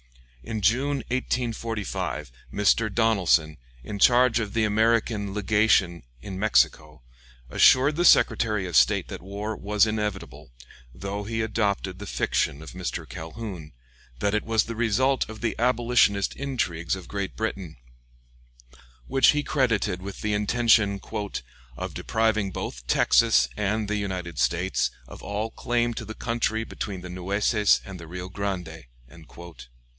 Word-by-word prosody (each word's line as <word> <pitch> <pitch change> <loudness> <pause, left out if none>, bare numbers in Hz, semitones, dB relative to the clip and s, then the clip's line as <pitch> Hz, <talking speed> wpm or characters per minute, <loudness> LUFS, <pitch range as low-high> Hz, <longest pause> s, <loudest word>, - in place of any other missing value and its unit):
In 110 - -4
June, 130 +7 +1
1845, 115 - -3 0.2
Mr. 105 +2 +2
Donelson, 95 -8 +2 0.3
in 100 +6 -6
charge 120 +1 +5
of 105 -3 -4
the 115 - +2
American 110 -1 +1
Legation 105 -4 +2 0.2
in 95 -2 -6
Mexico, 75 - +1 0.5
assured 140 +4 +5
the 175 - +1
Secretary 105 - +4
of 90 -3 -5
State - - +4
that - - -7
war 100 +4 -5
was 105 +1 +2
inevitable, 105 -3 -4 0.5
though 100 +6 -5
he 115 +1 -2
adopted 100 -4 -1
the 105 - -7
fiction 70 +3 -1
of 80 - -10
Mr. 90 0 -5
Calhoun, 85 -1 -8 0.5
that 100 +10 0
it 105 - +1
was 110 -2 +2
the 115 - -6
result 120 +4 +1
of 110 -1 -9
the 115 -2 -1
abolitionist 120 -5 +2
intrigues 95 -12 -2
of 95 -2 -10
Great 100 -1 -4
Britain, 95 -7 -4 1.3
which 135 0 +3
he 150 0 +2
credited 110 -11 0
with 100 +1 -8
the 105 0 -1
intention 105 -1 +3 0.8
"of - - -5
depriving 110 -3 0
both - - -6
Texas 65 +1 +4
and 105 +1 -1
the 105 0 -1
United 90 -5 -4
States 90 +2 +1 0.2
of - - -11
all 105 +2 -3
claim 120 0 -1
to - - -6
the 110 - -8
country 115 -2 -1
between 100 -4 -6
the 90 - -8
Nueces 100 +3 +2
and 95 -2 -9
the 85 - -10
Rio 90 +2 -7
Grande." 90 -6 -5
105 Hz, 140 wpm, -25 LUFS, 95-115 Hz, 1.3 s, charge